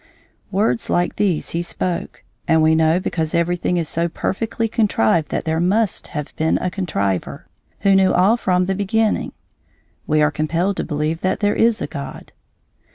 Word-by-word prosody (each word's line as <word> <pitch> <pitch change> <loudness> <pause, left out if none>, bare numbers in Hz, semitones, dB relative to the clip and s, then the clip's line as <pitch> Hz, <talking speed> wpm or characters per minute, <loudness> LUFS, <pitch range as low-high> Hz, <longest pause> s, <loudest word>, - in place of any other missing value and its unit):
Words 195 - 0
like 175 0 0
these 190 -6 0
he 170 - -1
spoke, 175 0 -4 0.2
and 160 -1 +4
we 160 0 +4
know 160 +2 +3
because 160 -2 -2
everything 175 +1 0
is 165 -2 -1
so 170 +3 0
perfectly 225 +6 -2
contrived 170 - +1
that - - -3
there 160 0 0
must 195 +3 +1
have 150 -3 -6
been 160 0 +2
a 180 - -2
contriver, 100 - -2 0.4
who 200 - +4
knew 190 -1 +4
all 190 +5 +4
from 180 -6 +1
the 190 - 0
beginning. 210 +3 0 0.8
We 155 0 +3
are 150 - +3
compelled 165 +6 -1
to - - -1
believe 155 +1 -2
that 185 0 0
there 205 0 +1
is 230 -1 +2
a - - 0
God. 140 -2 -8
175 Hz, 170 wpm, -20 LUFS, 160-195 Hz, 0.8 s, and